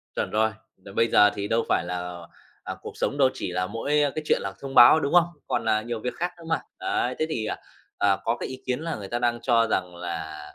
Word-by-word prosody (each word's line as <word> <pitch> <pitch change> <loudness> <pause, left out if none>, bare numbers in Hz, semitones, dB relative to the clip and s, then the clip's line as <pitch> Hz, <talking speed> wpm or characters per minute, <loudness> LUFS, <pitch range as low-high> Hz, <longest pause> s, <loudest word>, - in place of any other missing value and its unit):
Chuẩn - - -1
rồi, 110 +1 +2 0.3
đ 95 - -20
bây 115 - +3
giờ 105 -2 +6
thì 100 0 -3
đâu 115 +2 +1
phải - - +2
là 90 -1 -5 0.4
à, - - -5
cuộc - - -9
sống 140 - -1
đâu 135 -2 +5
chỉ - - -4
là 90 +1 -1
mỗi 115 +7 -4 0.2
cái 155 - -3
chuyện - - +3
là 100 -1 -4
thông 135 -1 -6
báo, 120 +6 +9
đúng 140 -1 -2
không? 175 -1 +7 0.2
Còn - - -1
là 110 -1 +2
nhiều 115 0 -4
việc 125 - -3
khác 175 +1 -2
nữa 170 - -13
mà. 160 - +1 0.2
Đấy, 375 0 -1
thế 155 - +2
thì, 115 -8 -2
à, - - -3 0.4
à, 100 -1 +3
có 115 +1 0
cái - - -4
ý 130 - -8
kiến 125 +1 -1
là 165 0 -3
người 100 -2 -7
ta 120 +4 -2
đang 120 -1 +1
cho 115 -2 +3
rằng 90 -4 -1
là 80 -3 -5
115 Hz, 260 wpm, -25 LUFS, 95-135 Hz, 0.4 s, báo